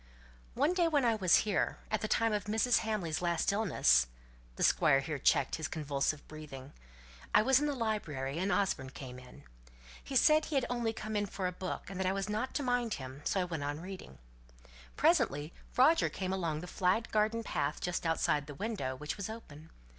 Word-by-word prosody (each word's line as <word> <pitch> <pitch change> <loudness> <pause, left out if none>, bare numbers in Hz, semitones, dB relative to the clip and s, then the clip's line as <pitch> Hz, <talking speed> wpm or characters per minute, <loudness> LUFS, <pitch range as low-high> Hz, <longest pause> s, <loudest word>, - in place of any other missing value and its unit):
"One 290 +7 +2
day 350 -2 +3
when 290 -5 +2
I 230 - +4
was 190 -6 +4
here, 205 -3 0
at 215 - 0
the 215 - -1
time 225 0 +2
of 210 - -1
Mrs. 220 +3 +2
Hamley's 200 -8 -2
last 170 0 +1
illness" 190 - +3 0.5
(the - - -2
Squire 135 - +4
here 145 +1 -4
checked 135 +2 +2
his 160 -1 -3
convulsive 145 -2 -2
breathing), 145 -3 -10 0.6
"I - - +7
was 265 +2 +5
in 295 - 0
the 290 - -1
library, 165 - -2
and 190 +2 0
Osborne 190 -11 0
came 130 -1 -9
in. 125 0 -14 0.6
He 270 - -6
said 305 +4 +5
he 305 - -4
had 265 -3 +2
only 240 -2 0
come 220 -1 -5
in 205 0 0
for 190 -1 -4
a 180 - 0
book, 185 0 -5
and 195 0 -6
that 190 - 0
I 190 - +2
was 195 +1 -3
not 215 +5 -2
to 290 - 0
mind 245 -3 0
him, 130 0 -8
so 190 - +1
I - - 0
went 165 -4 -4
on 145 +1 -3
reading. 180 - -9 0.8
Presently, 145 +4 +2 0.2
Roger 310 +6 +5
came 190 -1 -3
along 165 -5 -2
the - - -6
flagged 185 +5 0
garden 220 +2 +1
path 150 -7 -2
just 180 0 -2
outside 155 -3 +1
the 145 - -8
window 165 - -3
(which 150 +7 -5
was 200 +1 -4
open). 160 -9 -10
190 Hz, 205 wpm, -32 LUFS, 150-225 Hz, 0.8 s, I